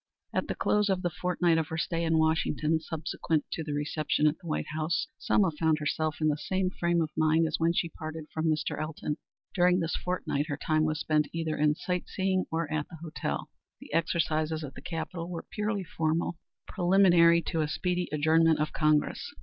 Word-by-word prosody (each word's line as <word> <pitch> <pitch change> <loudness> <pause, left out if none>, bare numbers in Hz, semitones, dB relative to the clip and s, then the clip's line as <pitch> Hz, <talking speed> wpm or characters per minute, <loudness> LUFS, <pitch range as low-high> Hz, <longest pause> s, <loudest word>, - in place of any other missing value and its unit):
At - - 0
the - - -2
close 210 0 +2
of 190 -1 0
the 175 - 0
fortnight 175 -1 +1
of 160 - -1
her 160 - -4
stay 165 +1 -1
in 165 -1 +2
Washington 160 0 +2
subsequent 160 -1 -2
to 165 - -3
the 150 -1 -4
reception 150 +1 0
at 150 +1 +4
the 175 - -12
White 155 - -2
House, 155 +2 0
Selma 190 -5 +3
found 160 0 +1
herself 155 +1 -1
in 155 - +2
the 150 -1 +1
same 185 +3 -1
frame 170 -2 +1
of 155 - -5
mind 160 +1 +3
as 155 - -1
when 165 +1 +3
she 170 0 0
parted 155 0 -7
from 160 0 -1
Mr. 155 -1 0
Elton. 155 -1 -3 0.4
During 180 0 +4
this 165 -2 -1
fortnight 165 -5 -2
her 145 -3 -3
time 155 0 +1
was 155 -1 -1
spent 150 -1 +1
either 165 -2 -2
in 150 0 +2
sight 180 +2 -3
seeing 190 -1 0
or 165 0 -1
at 150 -1 -2
the 165 - -10
hotel. 160 - -4 0.3
The - - -12
exercises 160 -2 0
at 140 - -7
the - - -10
Capitol 165 0 -5
were 170 -2 -5
purely 210 -2 -1
formal, 165 0 -1 0.3
preliminary 175 -3 +5
to 165 - -1
a 155 - 0
speedy 180 +3 -1
adjournment 160 +2 +4
of 150 0 -1
Congress. 155 -1 +1
160 Hz, 200 wpm, -29 LUFS, 155-175 Hz, 0.4 s, preliminary